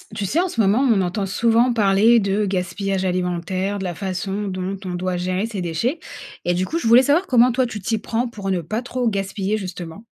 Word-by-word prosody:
Tu 200 - -2
sais, 295 - 0
en 370 - +2
ce 230 - -1
moment, 205 +3 +3
on 210 -5 +4
entend 185 +3 -1
souvent 230 +5 +2
parler 220 +2 +4
de 200 +1 0
gaspillage 190 +1 -2
alimentaire, 185 +2 -1
de 195 - -5
la 180 -2 -3
façon 195 +2 -3
dont 185 +1 -3
on 180 - -4
doit 180 0 -2
gérer 185 +4 -1
ses 215 -4 -5
déchets 180 - -1 0.5
et, 175 - +2
du 180 +1 0
coup, 320 - -3
je 230 - -2
voulais 235 +3 +7
savoir, 305 +8 +2
comment 250 0 +5
toi 255 +2 +1
tu 220 -4 -6
t'y 220 +4 -1
prends 235 +3 -2
pour 200 -4 -6
ne 185 -2 0
pas 215 +8 -3
trop 250 -1 -1
gaspiller, 195 0 -2
justement? 185 0 -7
195 Hz, 225 wpm, -21 LUFS, 185-230 Hz, 0.5 s, voulais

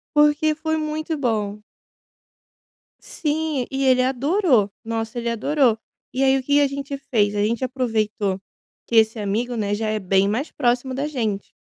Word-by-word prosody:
Porque 295 +1 +4
foi 315 0 -1
muito 310 +1 -3
bom. 215 -6 -1 1.4
Sim 305 -3 -2
e 270 0 -1
ele 255 -1 +5
adorou! 265 - +2
Nossa 225 +1 -3
ele 235 0 -2
adorou! 240 0 +2 0.4
E 265 - +1
aí 270 0 +4
o - - -2
que 285 +3 -2
que 290 - +6
a 285 - +4
gente 275 0 -5
fez? 225 -7 0
A 205 - +1
gente 230 +3 0
aproveitou 215 -6 -1 0.5
que 235 - -2
esse 220 0 +4
amigo, 220 +4 -1
né, 205 -2 -1
já 215 +1 -2
é 215 0 -1
bem 195 0 +2
mais 235 +9 -2
próximo 250 0 0
da 275 +3 -2
gente 220 -9 -3
250 Hz, 170 wpm, -22 LUFS, 215-285 Hz, 1.4 s, que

